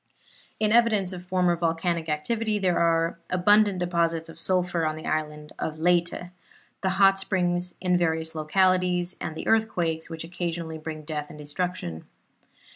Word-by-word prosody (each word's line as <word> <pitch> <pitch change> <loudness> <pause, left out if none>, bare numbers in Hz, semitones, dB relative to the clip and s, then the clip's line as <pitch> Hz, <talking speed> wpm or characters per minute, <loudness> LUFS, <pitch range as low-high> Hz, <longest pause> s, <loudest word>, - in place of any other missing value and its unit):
In 215 -1 +2
evidence 215 -5 +3
of 180 -1 -7
former 180 -1 +2
volcanic 165 0 -1
activity 215 +8 -1
are 170 -1 +2
the - - 0
abundant 205 +2 +4
deposits 170 -2 0
of 165 - -12
sulphur 180 -2 +1
on 155 -1 0
the 155 - -9
island 150 -1 -3
of 155 0 -3
Leyte, 175 +1 +1 0.5
the 190 - +1
hot 195 0 +4
springs 180 -2 -1
in 180 -1 +1
various 160 -1 0
localities, 180 +2 +1
and 160 - -4
the - - -6
earthquakes 175 -8 +1
which 165 -1 -5
occasionally 165 -1 -4
bring 155 0 -6
death 150 -1 -4
and - - -11
destruction. 150 - -4
175 Hz, 150 wpm, -26 LUFS, 160-185 Hz, 0.5 s, abundant